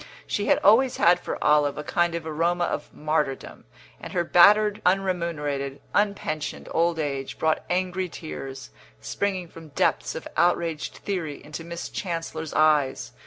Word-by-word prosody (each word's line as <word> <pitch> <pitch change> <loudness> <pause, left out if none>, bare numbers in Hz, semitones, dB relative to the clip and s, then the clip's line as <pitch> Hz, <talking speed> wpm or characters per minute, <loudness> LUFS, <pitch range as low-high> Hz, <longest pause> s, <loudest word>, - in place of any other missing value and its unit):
She 205 - -2
had - - +5
always 245 +6 +5
had 175 +1 +5
for - - -4
Olive 150 -1 +3
a 150 - -4
kind 175 +2 0
of 170 -1 -4
aroma 170 +3 0
of - - -3
martyrdom, 150 -3 -2 0.3
and - - -9
her 175 - +1
battered, 210 +5 +5
unremunerated, 170 -7 -1
un 205 0 +2
pensioned 155 -6 -5
old 170 0 +1
age 140 -3 -3
brought 160 0 +1
angry 185 0 -1
tears, 135 -5 -8 0.3
springing 185 - -2
from 165 -1 -12
depths - - 0
of - - -6
outraged 170 -2 +1
theory, 170 -7 -4
into 155 +2 -7
Miss 170 +1 -6
Chancellor's 165 -4 -4
eyes. 150 -3 +2
165 Hz, 150 wpm, -25 LUFS, 150-180 Hz, 0.3 s, had